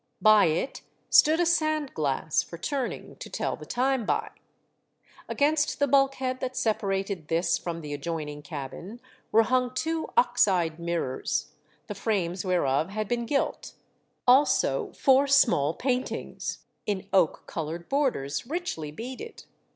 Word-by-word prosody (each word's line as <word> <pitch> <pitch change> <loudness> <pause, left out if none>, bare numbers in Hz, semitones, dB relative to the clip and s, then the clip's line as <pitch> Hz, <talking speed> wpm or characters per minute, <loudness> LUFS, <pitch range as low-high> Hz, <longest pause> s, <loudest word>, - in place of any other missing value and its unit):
By 215 -2 +6
it 165 - -1 0.3
stood 315 +2 +6
a 350 - +3
sand 310 -4 +1
glass 150 0 0
for 170 - -9
turning 265 - -4
to - - -9
tell - - -2
the - - -12
time 260 0 +1
by. - - -1 1.0
Against 295 +1 +1
the 285 - +2
bulkhead 270 -1 +2
that 255 0 -4
separated 195 -5 -1
this 170 +2 +1
from 170 -1 -5
the 150 -2 -6
adjoining 150 -1 -4
cabin 150 - -7 0.3
were 225 +1 +6
hung 250 +1 +1
two 320 +3 -2
ox 245 -3 +4
eyed 170 -4 0
mirrors, 170 -6 -2 0.3
the - - -5
frames 190 -3 -1
whereof 165 -4 +1
had 215 +1 -3
been 235 0 -2
gilt, 275 +1 -1 0.5
also 265 +4 +3
four 270 0 +4
small 220 - +4
paintings 255 -1 -3 0.2
in 195 -2 -2
oak 180 -5 +3
coloured 165 +1 -5
borders 235 - -1
richly 305 - -3
beaded. 255 - -8
215 Hz, 135 wpm, -27 LUFS, 170-270 Hz, 1.0 s, By